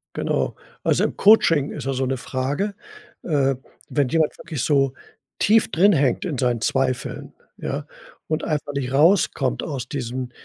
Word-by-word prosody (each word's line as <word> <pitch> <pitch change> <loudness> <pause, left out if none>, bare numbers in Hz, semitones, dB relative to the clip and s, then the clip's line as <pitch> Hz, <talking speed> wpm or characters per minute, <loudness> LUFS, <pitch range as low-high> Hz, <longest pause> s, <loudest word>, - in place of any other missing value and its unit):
Genau. - - -1 0.3
Also - - +2
im - - -3
Coaching 165 -9 +5
ist 150 - -6
ja 135 - -1
so 130 0 -1
'ne 130 +1 -1
Frage. 140 +11 -2 0.5
Äh, 135 -4 +1 0.3
wenn 145 -3 +1
jemand 160 +1 +1
wirklich 155 -7 -5
so 135 -3 +2 0.5
tief 220 +1 +3
drinhängt 165 -7 +3
in 155 -7 -3
seinen 125 -2 0
Zweifeln, 130 0 -1 0.2
ja, - - -4 0.4
und 155 0 -1
einfach 150 -2 -2
nicht 135 -2 -3
rauskommt 165 +8 +3
aus 135 -6 -4
diesem 125 -2 -4
140 Hz, 150 wpm, -22 LUFS, 130-160 Hz, 0.5 s, Coaching